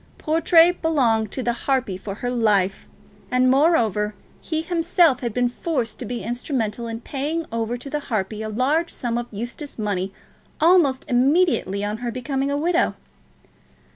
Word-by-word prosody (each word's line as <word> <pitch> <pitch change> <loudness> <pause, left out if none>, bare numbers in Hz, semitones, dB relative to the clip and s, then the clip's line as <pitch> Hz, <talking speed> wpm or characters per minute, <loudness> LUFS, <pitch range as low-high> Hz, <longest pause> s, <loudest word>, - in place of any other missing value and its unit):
Portray 330 +2 +4
belonged 245 - +1
to 260 - -3
the 240 - +1
harpy 255 -4 -1
for 195 +1 -6
her 245 +3 -3
life; 205 -5 +1 0.4
and 255 0 +3
moreover, 225 - +2 0.3
he 315 -1 -2
himself 335 -5 +3
had 240 -2 -3
been 245 +3 +1
forced 245 -2 -3
to 250 - -5
be 240 +2 -4
instrumental 235 -2 -2
in 230 0 -5
paying 295 +6 -3
over 230 +1 -2
to 245 - -9
the 295 +2 -2
harpy 215 -6 -3
a 215 - -4
large 280 +10 +1
sum 240 -2 -3
of 240 - -5
Eustace 240 +7 -7
money 200 -3 -2 0.5
almost 320 -6 +4
immediately 255 - +2
on 210 +1 -2
her 240 +1 -4
becoming 270 +3 -2
a 285 - 0
widow. 340 +4 +1
245 Hz, 160 wpm, -22 LUFS, 225-300 Hz, 0.5 s, Portray